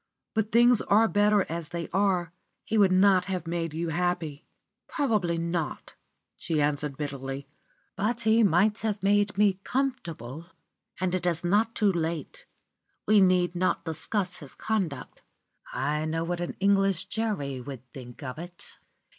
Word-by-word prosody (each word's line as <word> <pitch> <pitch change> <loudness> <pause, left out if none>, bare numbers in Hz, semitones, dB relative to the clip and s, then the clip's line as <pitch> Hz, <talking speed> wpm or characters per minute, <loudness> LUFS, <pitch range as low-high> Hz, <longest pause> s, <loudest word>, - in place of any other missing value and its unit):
But 220 0 -1
things 240 0 +5
are 220 +3 +4
better 205 -1 +3
as 165 -1 -2
they 170 +1 -4
are. 185 -3 +1 0.3
He 225 - -2
would 200 -3 +5
not 185 -1 +4
have 185 -3 -3
made 165 -1 -2
you 170 +1 -2
happy." 170 -3 -2 0.4
"Probably 210 - 0
not," 165 -3 -3 0.4
she 160 -2 -2
answered 145 -1 0
bitterly, 140 -1 -5 0.5
"but 220 +4 -1
he 220 +1 +4
might 205 +2 +3
have 210 -3 -2
made 205 0 +2
me 200 -2 +3
comfortable. 170 - -3 0.5
And 185 -1 0
it 180 -1 0
is 170 -1 0
not 210 +6 +2
too 210 -3 +3
late. 170 - -4 0.6
We 215 -1 +5
need 180 -2 +3
not 180 -1 0
discuss 180 +3 -2
his 145 -4 -12
conduct. 180 -12 -3 0.5
I 150 +1 -1
know 165 +1 -1
what 175 +1 -3
an 175 - -4
English 195 -2 +3
jury 190 - -2
would 130 -1 -9
think 125 +1 -10
of 130 +2 -6
it. 175 +1 -9
180 Hz, 150 wpm, -27 LUFS, 160-205 Hz, 0.6 s, things